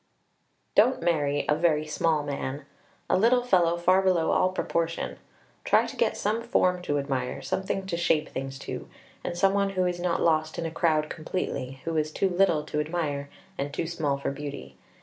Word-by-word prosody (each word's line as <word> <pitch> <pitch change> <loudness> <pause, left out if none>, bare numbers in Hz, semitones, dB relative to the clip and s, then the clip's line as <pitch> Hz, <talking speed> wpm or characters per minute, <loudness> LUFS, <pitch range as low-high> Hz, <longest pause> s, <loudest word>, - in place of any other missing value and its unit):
Don't 235 -1 +4
marry 145 -4 +1
a - - +4
very 155 -1 +2
small 155 0 +1
man 140 0 -4 0.4
a - - +3
little 235 +6 +4
fellow 175 -7 +3
far 185 +2 +4
below 185 -4 +2
all 185 - +3
proportion; 170 -2 -2 0.4
try - - +4
to - - -7
get - - +1
some 215 +3 0
form 185 -7 +1
to 145 -4 -1
admire, 135 -3 -2
something 190 0 -2
to 190 -3 -2
shape 160 -3 +1
things 135 0 -5
to, - - -6 0.3
and 175 - -4
some 195 +2 +4
one 200 0 +2
who 185 -2 0
is 175 -1 -1
not 175 -1 0
lost 155 -1 +1
in 165 - -2
a 165 - -3
crowd 155 -2 +1
completely, 150 -5 -4
who 165 -1 -1
is 155 0 0
too 195 +4 +1
little 175 -4 +2
to 150 0 -3
admire 150 -3 -2 0.3
and 140 +1 -2
too - - -1
small 160 -4 -1
for 140 - -2
beauty. 135 - -7
165 Hz, 190 wpm, -27 LUFS, 145-185 Hz, 0.4 s, Don't